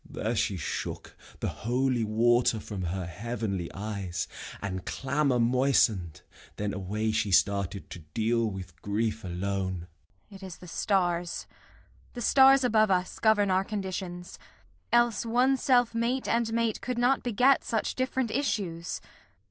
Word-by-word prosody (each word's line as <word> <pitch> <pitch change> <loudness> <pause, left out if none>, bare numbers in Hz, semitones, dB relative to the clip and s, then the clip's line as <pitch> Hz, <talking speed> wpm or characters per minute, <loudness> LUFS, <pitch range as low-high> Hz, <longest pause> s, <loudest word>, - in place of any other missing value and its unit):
There 115 +2 -3
she 100 -3 0
shook 75 - -5 0.3
The - - 0
holy 125 +1 0
water 115 +1 +3
from 100 -3 -5
her 90 +1 -3
heavenly 105 -2 -4
eyes, 100 -4 -4 0.3
And 95 -2 -4
clamour 140 +1 0
moisten'd. 115 - +2 0.3
Then 105 0 -2
away 105 +3 -2
she 110 -2 0
started 100 0 +1
To - - -7
deal 110 +9 0
with 90 -5 -9
grief 110 +2 -1
alone. 95 -1 -3 0.5
Kent. 195 -1 -12
It - - -11
is 185 -2 -8
the 180 - -12
stars, 175 -2 0 0.7
The 240 - -5
stars 270 +3 +6
above 215 -3 +3
us, 185 -1 0
govern 210 -3 +3
our 185 +1 +3
conditions; 185 -3 -5 0.5
Else 240 -2 +3
one 245 +4 +3
self 245 -3 +3
mate 235 +3 0
and 230 -1 +1
mate 230 -1 0
could 250 -1 -3
not 250 +3 +3
beget 250 +3 +3
Such 225 - -1
different 260 -2 -1
issues. 185 -11 -2
130 Hz, 140 wpm, -28 LUFS, -, 0.7 s, stars